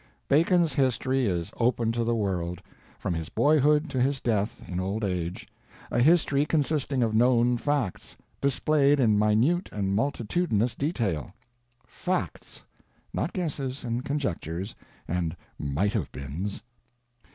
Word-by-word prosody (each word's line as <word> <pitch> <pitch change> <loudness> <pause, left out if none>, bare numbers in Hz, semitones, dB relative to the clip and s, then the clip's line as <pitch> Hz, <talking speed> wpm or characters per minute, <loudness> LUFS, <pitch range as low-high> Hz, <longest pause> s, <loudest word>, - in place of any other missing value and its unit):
Bacon's 165 +1 +3
history 130 -1 +1
is 85 -3 -2
open 115 -1 +1
to 115 0 -1
the 115 +1 +1
world, 90 -5 -2 0.4
from - - -2
his 80 -2 -4
boyhood 150 +1 +3
to 130 -3 0
his 135 +2 +1
death 110 -3 -1
in 90 0 -3
old 100 +4 -2
age—a 90 +3 -4
history 145 0 +4
consisting 150 -4 0
of 110 -2 0
known 120 +1 +4
facts, 135 -5 -2 0.2
displayed 140 +1 +3
in 110 -5 +4
minute 115 - +2
and 100 -2 -1
multitudinous 120 - 0
detail; 110 - -2 0.5
facts, - - -4 0.5
not 165 - -1
guesses 140 -7 -3
and 120 +1 -2
conjectures 100 - -3 0.3
and 85 -1 -2 0.2
might 75 +9 0
have - - -2
beens. 75 +9 -5
120 Hz, 125 wpm, -27 LUFS, 100-140 Hz, 0.5 s, history